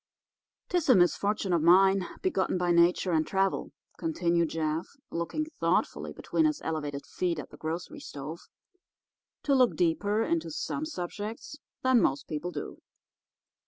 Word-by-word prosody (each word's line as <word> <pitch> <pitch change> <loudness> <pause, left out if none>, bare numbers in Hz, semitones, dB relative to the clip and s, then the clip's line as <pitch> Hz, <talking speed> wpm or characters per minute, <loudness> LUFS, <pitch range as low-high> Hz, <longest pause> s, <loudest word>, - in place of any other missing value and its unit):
"'Tis 350 -5 0
a 255 - +8
misfortune 195 +2 +2
of 170 - +3
mine, 190 +2 +5 0.2
begotten 195 - +1
by 180 -1 +1
nature 175 +2 +4
and 160 -1 +2
travel," 195 0 0 0.3
continued 170 - +1
Jeff, 160 +1 -2 0.2
looking 170 - -2
thoughtfully - - 0
between 320 - 0
his 305 -1 +1
elevated 145 -3 -3
feet 175 -2 -2
at 150 - -7
the 150 - -12
grocery 170 - -5
stove, 155 - -7 1.0
"to 280 - +2
look 255 -3 +4
deeper 205 +5 +1
into 330 +3 -1
some 400 -11 -3
subjects 220 - -6 0.2
than 260 -3 +5
most 135 +1 0
people 155 +3 -3
do. - - -6
180 Hz, 140 wpm, -29 LUFS, 165-255 Hz, 1.0 s, a